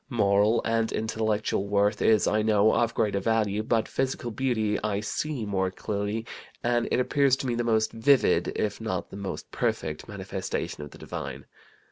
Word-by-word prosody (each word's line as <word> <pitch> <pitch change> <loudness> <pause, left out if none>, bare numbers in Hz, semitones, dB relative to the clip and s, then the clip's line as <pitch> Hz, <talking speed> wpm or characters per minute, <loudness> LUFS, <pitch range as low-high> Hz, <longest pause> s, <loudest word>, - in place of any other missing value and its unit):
Moral 105 -2 +3
and 115 -1 +1
intellectual 110 -2 -1
worth 105 +1 +2
is, 110 -2 +4
I 110 - +2
know, 105 0 +4
of 120 -1 +1
greater 100 -2 +1
value, 105 0 +1
but 110 0 +1
physical 130 -2 -2
beauty 110 -3 0
I 105 -2 0
see 125 +4 -3
more 95 -2 0
clearly, 105 +3 -3 0.4
and 120 0 +1
it - - +1
appears 135 +1 +3
to 135 - -5
me 125 - 0
the 120 0 0
most 110 -2 +2
vivid 130 +4 +3
(if 105 +1 -2
not 100 -5 -3
the - - -8
most 100 -1 -6
perfect) 75 -1 -2
manifestation 95 -5 -4
of 75 - -8
the - - -14
divine. - - -6
110 Hz, 170 wpm, -27 LUFS, 100-115 Hz, 0.4 s, is